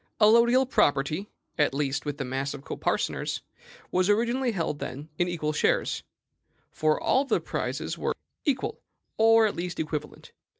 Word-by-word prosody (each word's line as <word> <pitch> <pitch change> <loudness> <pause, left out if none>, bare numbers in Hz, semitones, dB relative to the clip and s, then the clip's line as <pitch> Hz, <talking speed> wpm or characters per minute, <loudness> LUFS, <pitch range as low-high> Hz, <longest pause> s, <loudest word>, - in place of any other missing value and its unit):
Allodial 235 +4 +6
property, 150 - +1 0.3
at 145 -2 +3
least 145 0 -1
with 145 -1 -3
the 135 - -3
mass 135 +3 -2
of 140 - -10
coparceners, - - -2 0.5
was 185 +2 +2
originally 240 +4 +2
held, 165 -7 -2
then, 145 +5 -6
in 175 - +3
equal 155 -3 -2
shares; - - +1 0.7
for 155 0 +1
all 265 - +3
of 275 - -5
the - - +3
prizes - - -3
were - - -1 0.3
equal, 270 -4 -1 0.4
or, 225 0 +6
at 210 - 0
least, 175 0 -4
equivalent. 150 -1 -5
175 Hz, 155 wpm, -27 LUFS, 145-225 Hz, 0.7 s, Allodial